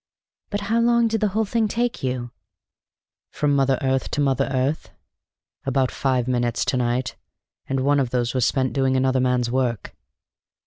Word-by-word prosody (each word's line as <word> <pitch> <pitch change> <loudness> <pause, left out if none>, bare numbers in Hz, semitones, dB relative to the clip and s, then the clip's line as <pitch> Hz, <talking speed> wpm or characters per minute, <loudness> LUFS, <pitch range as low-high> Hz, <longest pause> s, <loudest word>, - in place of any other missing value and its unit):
"But 205 0 -2
how 225 +3 0
long 235 0 +3
did 225 -1 -1
the 210 - +3
whole 215 +3 0
thing 225 +1 0
take 235 +3 -2
you?" 125 -2 -3 1.0
"From 145 -1 0
mother 135 -1 +2
earth, 130 -1 0
to - - -3
mother 135 -1 +1
earth? 135 +3 -1 0.7
About 135 -1 0
five 130 -3 0
minutes, 120 -2 0
to 130 - 0
night, 120 0 -1 0.5
and 135 0 -1
one 145 +2 +3
of 130 -3 0
those 120 -1 -1
was 130 -2 +1
spent 130 +2 +1
in - - -11
doing 135 -1 +1
another 130 0 +2
man's 125 -2 +1
work." 125 -4 -2
130 Hz, 175 wpm, -23 LUFS, 125-145 Hz, 1.0 s, long